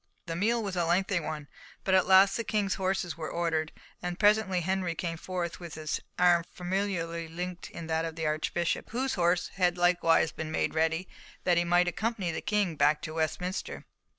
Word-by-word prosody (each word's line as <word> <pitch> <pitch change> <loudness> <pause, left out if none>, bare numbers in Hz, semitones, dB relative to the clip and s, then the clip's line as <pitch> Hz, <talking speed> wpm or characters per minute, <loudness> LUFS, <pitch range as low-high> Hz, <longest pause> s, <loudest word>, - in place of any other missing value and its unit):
The 165 -2 -4
meal 225 +6 +1
was 195 -2 -3
a 175 - +1
lengthy 185 +2 +2
one, 150 -2 -5 0.4
but 190 - +1
at 185 -1 +4
last 190 +1 +6
the 230 - -1
King's 210 -3 0
horses 185 -2 -1
were 160 -1 -5
ordered, 165 -2 -1 0.3
and 175 0 -3
presently 205 -3 +3
Henry 185 -1 -1
came 165 -1 -3
forth, 175 0 -4
with 170 -3 -8
his 155 -1 -3 0.2
arm 175 -1 +5
familiarly 175 -3 -2
linked 180 +2 -6
in 170 - -8
that 160 0 0
of 165 -1 -4
the 160 -1 -3
Archbishop, 155 +2 -1
whose 260 +3 -1
horse 175 -1 +1
had 180 -2 +2
likewise 175 -2 +3
been 160 -1 -5
made 160 - 0
ready 160 +3 +1 0.4
that 175 -1 +3
he - - +2
might 175 +1 +3
accompany 200 -1 -1
the 160 - -4
King 205 -5 0
back 150 +1 +3
to 155 -2 -5
Westminster. 160 +4 -3
175 Hz, 190 wpm, -29 LUFS, 165-190 Hz, 0.4 s, last